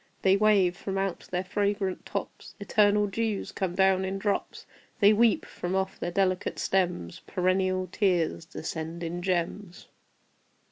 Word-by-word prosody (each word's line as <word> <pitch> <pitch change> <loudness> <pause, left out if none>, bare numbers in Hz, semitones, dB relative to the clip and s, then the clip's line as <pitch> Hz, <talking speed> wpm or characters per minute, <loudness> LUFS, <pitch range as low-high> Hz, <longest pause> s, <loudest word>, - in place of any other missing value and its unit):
They 190 0 +5
wave: 200 -4 +4
from 195 +1 -4
out 195 -2 -2
their 180 0 -1
fragrant 200 -1 -1
tops - - -6
Eternal 205 0 +3
dews 210 0 -2
come 185 -2 -3
down 190 0 +3
in 190 +1 -2
drops. 200 +1 -2 0.3
They 205 0 +6
weep: 225 +1 +3
from 180 +1 -4
off 190 0 -2
their - - -2
delicate 185 0 0
stems 180 - -1
Perennial 185 0 +1
tears 180 -6 +1
descend 160 +1 -6
in 170 +1 -4
gems. 180 +1 -3
190 Hz, 140 wpm, -28 LUFS, 180-200 Hz, 0.3 s, They